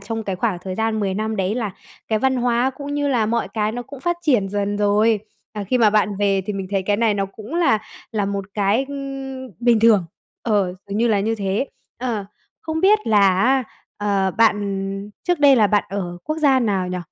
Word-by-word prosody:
trong 225 +3 -4
cái 195 -2 -3
khoảng 185 -2 -1
thời 185 -1 -4
gian 220 0 0
10 195 -2 -1
năm 220 +1 -2
đấy 195 +2 0
là 225 -5 -2 0.4
cái 220 -1 +1
văn 265 +2 +1
hóa 245 +1 +1
cũng 285 +2 -6
như 290 -1 0
là 235 -5 +2
mọi 235 +1 0
cái 215 -1 -1
nó 245 +1 -4
cũng 280 +1 -11
phát 345 +3 0
triển 245 - +2
dần 205 0 -1
rồi. 210 +1 +3 0.3
À, 210 -2 -4
khi 250 +6 +1
mà 215 -3 +5
bạn 210 -1 +1
về 200 -1 +2
thì 210 - -2
mình 195 -1 -4
thấy 195 -1 0
cái 205 +1 +1
này 225 -2 +2
nó 195 -1 -1
cũng 215 +9 -10
là 330 -11 +3 0.3
là 210 -2 0
một 200 -1 -3
cái, 210 +5 +2
ừm, 270 -2 -6
bình 235 -2 +4
thường, 215 -6 +5 0.4
ờ, 200 -5 +1
dường 200 +1 -3
như 235 +1 +3
là 205 -2 +2
như 225 +2 0
thế. 200 +5 -1 0.3
Ờ, 235 -5 -2 0.4
không 320 0 -3
biết 420 +3 +5
là 215 -2 +4 0.2
á, 265 +1 +3 0.3
ờ, 200 -2 0
bạn 205 -3 +2 0.4
trước 355 -3 +1
đây 280 -2 +7
là 215 -2 +5
bạn 205 0 +2
ở 180 -3 -4
quốc 310 - -2
gia 275 -4 +4
nào 195 -5 0
nhỉ? 180 0 -3
215 Hz, 225 wpm, -21 LUFS, 200-250 Hz, 0.4 s, đây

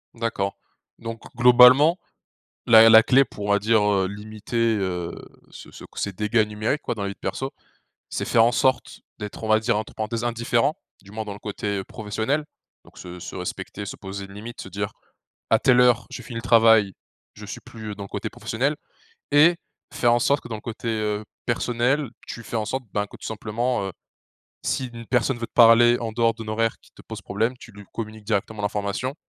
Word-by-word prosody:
D'accord 115 -4 -2 0.4
donc 115 0 -7
globalement 125 +7 +7 0.7
la 115 -1 +9
la 110 0 +9
clé 135 +3 +5
pour 105 -4 -8
on - - -3
va 100 - +4
dire, 110 +1 +3
heu, 100 -2 +2
limiter, 110 +3 -2
heu, 90 -3 -2 0.4
ce - - -12
ce - - -12
ces 100 - -2
dégâts 105 +2 +1
numériques 110 +7 -2
quoi - - -2
dans 105 - -5
la 100 - -2
vie 100 - -7
perso. 135 +1 -4 0.6
C'est - - -3
faire 115 - +4
en 120 - +4
sorte 130 0 0 0.2
d'être 105 +2 -7
on - - -2
va 110 0 +4
dire 115 -1 0
entre 110 - -5
parenthèses 115 +2 -3
indifférent 120 +4 +1 0.3
du 100 - -16
moins 110 +1 -4
dans 105 - -5
le 100 - -11
côté, 105 -1 -3
heu, 95 - -3
professionnel. 110 +10 -2 0.4
Donc - - -20
se 90 0 -9
se - - -8
respecter 100 0 -6
se - - -6
poser 100 0 -7
une 100 - -13
limite 115 +3 -9
se 95 - -9
dire: 100 +2 -4 0.6
«À 110 - +4
telle 125 -2 +4
heure 125 -1 +3
je - - -6
finis 120 -3 -7
le - - -4
travail, 110 -4 +5 0.4
je - - -10
suis - - -8
plus, 110 -2 -9
heu, 105 - -7
dans 100 - -7
le 100 - -10
côté - - -4
professionnel» 135 +7 -2 0.6
et 160 +4 +6 0.4
faire 120 -1 +3
en 120 - +3
sorte 140 +4 +2
que - - -10
dans 110 - -3
le 105 - -9
côté, 115 0 -6
heu, 105 -1 -2 0.2
personnel 125 +3 0 0.2
tu 115 - -7
fais 115 - -7
en 110 - -1
sorte 130 +4 -3
ben, 105 0 0
que - - -13
tout - - -11
simplement, 110 0 -2
heu, - - -5 0.8
si 130 - -1
une 115 -1 -9
personne 125 0 +1
veut 115 - -4
te - - -41
parler 120 0 +7
en 115 -2 -4
dehors 115 0 +2
d'un 110 -1 -9
horaire 115 +1 0
qui - - -23
te - - -17
pose - - -9
problème, 115 +5 -1
tu - - -13
lui 105 0 -12
communiques 110 -1 -6
directement 105 0 -2
l'information 105 +6 -2
110 Hz, 215 wpm, -24 LUFS, 105-120 Hz, 0.8 s, la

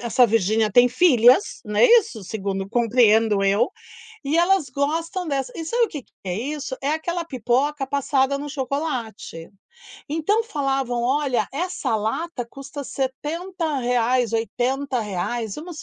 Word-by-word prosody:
essa 240 +1 +3
Virginia 220 0 +2
tem 245 +3 +6
filhas, 255 - +4
não 210 -1 -6
é - - +8
isso? 440 - +3
Segundo 195 -1 -4
compreendo 225 -2 +3
eu, 195 +2 +3 0.6
e 290 +4 0
elas 350 -3 +3
gostam 325 +6 -2
dessa 270 -4 -2
e 330 - -5
sabe 475 +8 +1
o - - -9
que 295 - -6
que - - -37
é 180 - -2
isso? 275 +5 -4
É 275 - -1
aquela 340 +2 -2
pipoca 270 +1 0
passada 280 0 +1
no 290 +1 -6
chocolate. 260 - -4 0.6
Então 325 +9 +1
falavam: 270 - -1
"Olha, 265 0 0
essa 310 -6 -2
lata 245 +5 -3
custa 275 +2 -8
R$70, 265 - -1
R$80. 230 -3 -2
Vamos 320 +1 -8
265 Hz, 135 wpm, -22 LUFS, 230-300 Hz, 0.6 s, é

